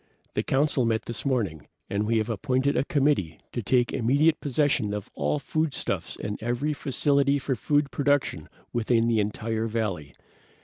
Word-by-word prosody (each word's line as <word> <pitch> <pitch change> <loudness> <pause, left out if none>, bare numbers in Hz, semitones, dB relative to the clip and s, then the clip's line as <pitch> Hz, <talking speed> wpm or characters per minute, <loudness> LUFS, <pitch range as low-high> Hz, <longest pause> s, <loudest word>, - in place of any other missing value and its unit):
The - - +1
Council 135 -1 +1
met 115 -1 +1
this 120 +4 -3
morning, 105 - -1 0.2
and 105 +1 -1
we 115 0 +2
have 110 -1 0
appointed 130 +5 0
a - - +2
committee 140 - +1
to 120 - -3
take 120 +3 +2
immediate 145 +7 +3
possession 140 -7 +1
of 105 - -6
all - - 0
foodstuffs 155 -1 -2
and 105 0 -4
every 120 +6 -1
facility 140 0 +2
for 135 -1 -1
food 145 +6 +1
production 140 - 0 0.2
within 115 0 +2
the 115 -2 +2
entire 110 +2 -1
valley. 100 - -3
120 Hz, 160 wpm, -26 LUFS, 110-140 Hz, 0.2 s, immediate